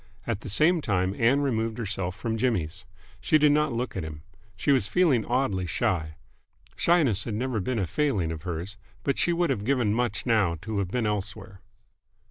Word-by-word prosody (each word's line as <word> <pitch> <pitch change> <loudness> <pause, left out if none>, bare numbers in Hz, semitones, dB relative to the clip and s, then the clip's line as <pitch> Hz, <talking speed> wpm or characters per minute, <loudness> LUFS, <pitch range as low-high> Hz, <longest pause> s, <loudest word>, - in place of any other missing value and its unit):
At 110 -3 -2
the - - -7
same 155 - +3
time 95 -5 0
Ann 120 +7 +3
removed 115 -5 -1
herself 95 -5 -3
from 110 +3 -3
Jimmy's. 110 -10 -1 0.3
She 155 - +3
did 150 -1 +5
not 150 0 +2
look 120 +1 -3
at 95 - -3
him. 75 -1 -8 0.3
She 90 - +1
was 130 -7 +3
feeling 145 -6 +3
oddly 105 -8 0
shy. 85 -5 -1 0.6
Shyness 140 - +2
had 110 - -3
never 125 0 -1
been 120 +5 -2
a 100 - +1
failing 100 - 0
of 80 -2 -6
hers, 90 +4 -5 0.3
but 140 - 0
she 175 - +2
would 170 0 +1
have 100 - -2
given 120 -4 +1
much 120 +1 -1
now 105 -8 +2
to 110 -2 -2
have 95 -3 -1
been 120 +2 -1
elsewhere. 105 -1 -4
110 Hz, 190 wpm, -27 LUFS, 95-130 Hz, 0.6 s, did